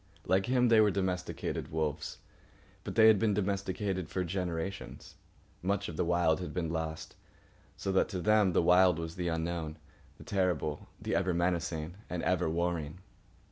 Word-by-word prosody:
Like 95 +4 +2
him, 125 -1 +3
they 115 -1 +6
were 105 - +5
domesticated 90 -2 -2
wolves. 80 -2 -2 0.7
But - - -6
they 110 - +7
had 110 -2 +7
been 105 -2 +2
domesticated 95 -2 -2
for 95 - -1
generations. 90 +1 -4 0.5
Much 100 +2 -1
of 85 - -6
the - - 0
Wild 85 -2 +2
had 90 - -6
been 85 -3 -1
lost, 80 -1 -4 0.6
so 95 - -2
that 95 - +2
to 95 -4 -3
them 105 -1 +3
the - - +3
Wild 90 0 +5
was 80 0 -5
the 90 -1 -2
unknown, 80 -1 -2 0.4
the - - -12
terrible, 90 -6 -1
the - - -3
ever 90 -1 +1
menacing 85 -1 -1
and 90 -2 -3
ever 90 -3 +1
warring. 85 -1 -2
90 Hz, 165 wpm, -31 LUFS, 80-95 Hz, 0.7 s, they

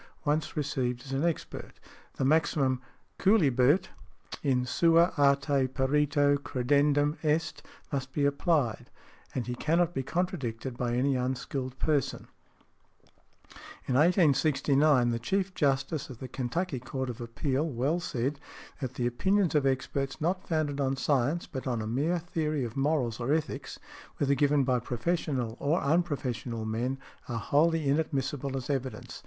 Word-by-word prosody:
_ - - -21 0.2
Once 155 +2 0
received 130 -4 -1
as 135 - -8
an 135 +2 0
expert, 170 -2 -3 0.4
|115| - - -27
the 135 - 0
maxim 140 -3 +2 0.4
"Cuilibet 160 - +4 0.5
in 130 -3 +1
sua 165 +5 +4
arte 140 -1 +3
perito 145 +2 +2
credendum 145 +3 +1
est," 155 +1 0 0.3
must 135 -2 -3
be 145 +1 0
applied, 140 - +1 0.5
and 125 - -1
he 125 - -3
cannot 170 +6 +1
be 135 - -1
contradicted 130 - -3
by 120 -1 -1
any 135 +2 +2
unskilled 130 +1 -3
person. 145 -4 0 1.6
In - - 0
1869, 145 -4 +4
the 115 - -1
Chief 190 +9 -1
Justice 135 0 0
of 130 - -9
the 130 - -7
Kentucky 135 +4 -2
Court 130 +1 -4
of 120 +1 -10
Appeal 130 +6 -1
well 140 +6 0
said, 140 -2 -2 0.4
that 130 -2 -4
"the 120 - -1
opinions 190 +10 +1
of 145 -3 +3
experts 135 +1 -1
not 180 +4 -1
founded 150 -3 0
on 135 0 +1
science, 140 +5 +1
but 130 -3 -6
on 120 -3 -1
a 110 - -3
mere 145 +10 0
theory 155 -4 -2
of 115 -2 -5
morals 135 -5 0
or 120 +3 -1
ethics, 155 0 -2 0.4
whether 140 -1 +2
given 145 +1 +3
by 130 -1 +2
professional 125 -1 -2
or 155 +5 +1
unprofessional 135 -8 -1
men, 120 +5 -1 0.3
are 120 - -2
wholly 150 +6 +2
inadmissible 140 -2 -1
as 130 - -5
evidence." 135 -3 -4
140 Hz, 145 wpm, -29 LUFS, 130-155 Hz, 1.6 s, Cuilibet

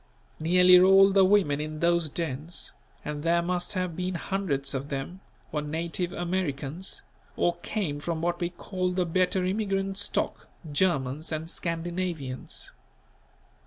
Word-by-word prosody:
Nearly 180 +3 +7
all 195 +1 +7
the 195 0 +5
women 185 -7 +3
in 155 0 -5
those 170 -1 +2
dens, 160 +1 -3 0.3
and 150 -1 -4
there 170 +2 +2
must 180 +1 -1
have 185 -3 -2
been 180 +1 -2
hundreds 160 -7 -1
of 135 +1 -4
them, 140 +7 -4 0.3
were 150 - -1
native 165 +4 -2
Americans, 175 -2 -3 0.3
or 175 0 +1
came 175 -5 -3
from 165 +2 -3
what 175 +1 -1
we 175 -1 -1
call 180 +1 -3
the 180 -1 +1
better 180 +2 +1
immigrant 195 0 -1
stock, 205 - 0 0.2
Germans 145 -2 0
and 160 +1 -3
Scandinavians. 170 -5 -3
175 Hz, 135 wpm, -27 LUFS, 155-185 Hz, 0.3 s, Nearly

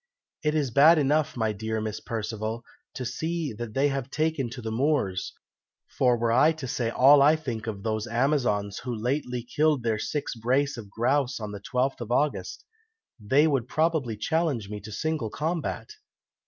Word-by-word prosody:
It 150 0 +1
is 145 -5 0
bad 155 +7 +7
enough, 150 +1 +1
my 110 -2 +1
dear 110 +2 -3
Miss 110 -1 -4
Perceval, 110 +1 -4 0.3
to 125 - -4
see 160 +3 -3
that 110 0 -7
they 140 +2 +3
have 135 -1 -3
taken 155 -4 -1
to 125 - -8
the 110 -2 -4
moors; 115 -7 0 0.6
for 125 -2 +3
were 115 0 0
I 150 +7 +5
to 155 -5 -7
say 120 -3 -1
all 140 +4 +6
I 150 +3 +6
think 120 -8 -5
of 100 -3 -5
those 110 0 -2
amazons 120 -5 0
who 125 -2 -4
lately 125 +1 -2
killed 145 +1 +1
their 110 -2 0
six 145 +6 -3
brace 130 +5 0
of 110 -4 -9
grouse 130 +5 0
on 105 -2 -5
the 100 -1 -7
12th 125 +4 -1
of 120 0 -5
August, 145 +4 -1 0.5
they 135 +9 +3
would 135 -6 +1
probably 155 -7 0
challenge 130 -4 -1
me 105 - -4
to 105 +2 -10
single 155 -1 -2
combat. 160 - -3
125 Hz, 180 wpm, -26 LUFS, 110-150 Hz, 0.6 s, bad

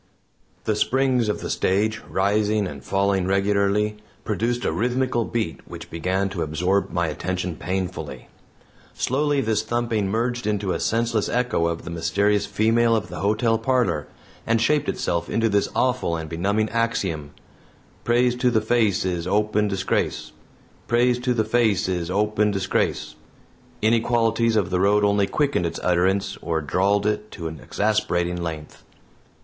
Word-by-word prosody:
The 110 - 0
springs 130 0 +1
of 105 - -2
the - - -5
stage, 105 +4 0
rising 105 +2 +1
and 70 -7 -7
falling 95 -1 +1
regularly, 100 +2 +1 0.3
produced 120 +3 -1
a - - +1
rhythmical 125 0 0
beat 85 -11 -3
which 85 0 -10
began 95 +4 -1
to 95 -3 -4
absorb 90 +6 0
my 85 -1 0
attention 90 +2 -3
painfully. 95 +2 -4 0.7
Slowly 145 +2 +1
this 110 -3 +1
thumping 115 -4 -1
merged 120 +2 -1
into 100 -2 0
a - - -1
senseless 115 -1 0
echo 120 -9 +1
of 85 0 -3
the - - -7
mysterious 100 +5 +1
female 115 +2 +2
of 110 - -2
the - - -6
hotel 110 +2 +1
parlor, 120 - 0 0.4
and 115 0 +3
shaped 145 +5 +2
itself 85 0 -2
into 115 0 +1
this 100 -1 +1
awful 125 -9 +1
and 80 -1 -5
benumbing 100 +7 0
axiom 100 -10 -1 0.7
"Praise 120 +1 +2
to 125 0 +2
the 115 -2 +2
face 110 -3 +1
is 90 -2 -2
open 105 +1 +1
disgrace. 95 -1 -1 0.6
Praise 120 +1 +2
to 125 0 0
the 110 -2 +1
face 110 -5 +2
is 90 -2 -2
open 105 +2 +1
disgrace." 95 -1 -1 0.7
Inequalities 115 0 +2
of 95 -5 +1
the 90 - +1
road 100 +2 +3
only 100 -1 +2
quickened 140 - 0
its 80 - -5
utterance 95 +2 +1
or 80 -1 -1
drawled 100 +6 +1
it 105 0 -1
to 85 -4 -5
an 80 -1 -7
exasperating 90 -1 0
length. 80 -3 -6
105 Hz, 150 wpm, -23 LUFS, 90-115 Hz, 0.7 s, and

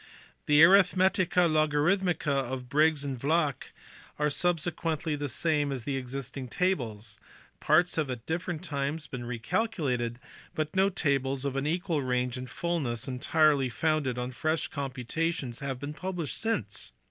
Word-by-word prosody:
The 150 +1 +6
Aritk 190 +2 +7
metica 185 -1 +3
Logarithmica 155 +2 +2 0.2
of 125 -1 -5
Briggs 150 +1 +3
and 135 -3 -4
Vlacq 150 0 +1 0.5
are 150 0 +1
substantially 165 -2 0
the 145 -1 -3
same 145 +2 0
as 130 -4 -4
the 140 +2 -2
existing 130 0 -5
tables: 115 - -2 0.4
parts 175 +4 +3
have 155 -4 0
at 120 -2 -5
different 175 0 -3
times 145 -1 -3
been 125 -2 -6
recalculated, 125 - -1 0.4
but 155 +1 -2
no 190 +1 +4
tables 140 -6 0
of 135 -1 -2
an 135 +1 -1
equal 170 -1 0
range 125 -1 0
and 125 0 -6
fulness 145 -8 -2
entirely 140 +1 +2
founded 145 -1 0
on 125 +1 -3
fresh 155 +5 -1
computations 135 0 -3
have 135 -2 -4
been 145 +2 -5
published 175 -2 -4
since. 110 - -2
145 Hz, 145 wpm, -29 LUFS, 130-165 Hz, 0.5 s, Aritk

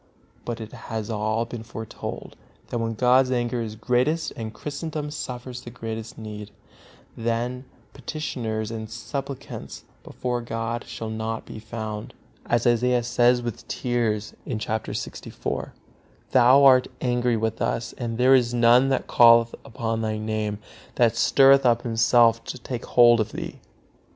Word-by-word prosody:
But 120 -1 -4
it 110 -1 -8
has 110 -1 -5
all 110 +2 0
been 115 -1 -7
foretold, 110 0 -7 0.3
that 120 - -2
when 115 0 -2
God's 125 +3 +4
anger 120 -1 0
is 110 -1 -5
greatest 125 +8 0
and 110 -1 -5
Christendom 150 +4 -5
suffers 125 -3 -6
the 120 - -9
greatest 115 0 -6
need, 105 -2 -7 0.7
then 120 +3 -2 0.3
petitioners 115 -8 -4
and 110 -1 -5
supplicants 135 +4 -6 0.2
before 125 -1 -3
God 115 0 -3
shall 110 -1 -6
not 110 0 -4
be - - -9
found, 110 -1 -6 0.3
as 120 -1 +1
Isaiah 120 +1 +3
says 120 0 +3
with 120 -2 -6
tears, 115 -4 -1 0.2
chapter 110 0 -3
lxiv: - - -5 0.6
"Thou 130 +2 +6
art 130 -2 +7
angry 120 -1 +1
with 110 0 -2
us, 115 - -1
and 115 -2 -4
there 130 +2 +5
is 120 -2 +3
none 120 +3 +5
that 135 - 0
calleth 115 -1 +6
upon 115 -3 -3
Thy 110 -1 -1
Name, 110 -1 -2 0.4
that 115 -2 +3
stirreth 135 +3 +5
up 120 -1 +3
himself 115 0 +4
to - - -5
take 125 -1 -6
hold 120 -1 +6
of 110 - -1
Thee." - - -6
120 Hz, 145 wpm, -24 LUFS, 110-125 Hz, 0.7 s, art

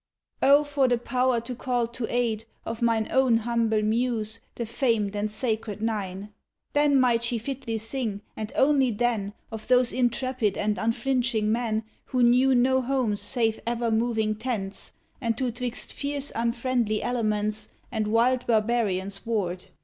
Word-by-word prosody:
Oh, 285 +2 +6
for 285 -2 +1
the 245 -1 +2
power 250 0 +1
to 240 +2 -6
call 245 -1 0
to 235 -1 -5
aid, 230 -3 0 0.2
of 225 +1 -5
mine 230 -2 +2
Own 260 -3 +4
humble 225 -1 +1
Muse, 225 0 0 0.2
the 235 - -3
famed 225 -4 0
and 205 +1 -1
sacred 215 -2 -3
nine. 205 -2 -3 0.4
Then 290 -1 +4
might 240 -2 +3
she 235 0 +1
fitly 235 -1 -4
sing, 225 -2 -3
and 215 0 -5
only 270 -2 +4
then, 220 -3 -1 0.2
Of 220 -1 -7
those 250 -1 +3
intrepid 245 -3 0
and 210 0 0
unflinching 230 -2 +1
men 225 -1 0 0.2
Who 255 -1 +1
knew 255 +2 +5
no 260 +2 +3
homes 250 -6 0
save 225 +1 0
ever 235 -1 0
moving 220 -1 +1
tents, 215 -4 -4 0.3
And 230 -2 -1
who 255 -2 0
'twixt 245 0 -4
fierce 285 0 -3
unfriendly 235 -1 0
elements 215 -3 0 0.2
And 220 -3 -1
wild 240 +3 +2
barbarians 210 -4 +1
warred. 185 -6 -1
230 Hz, 150 wpm, -26 LUFS, 215-250 Hz, 0.4 s, Oh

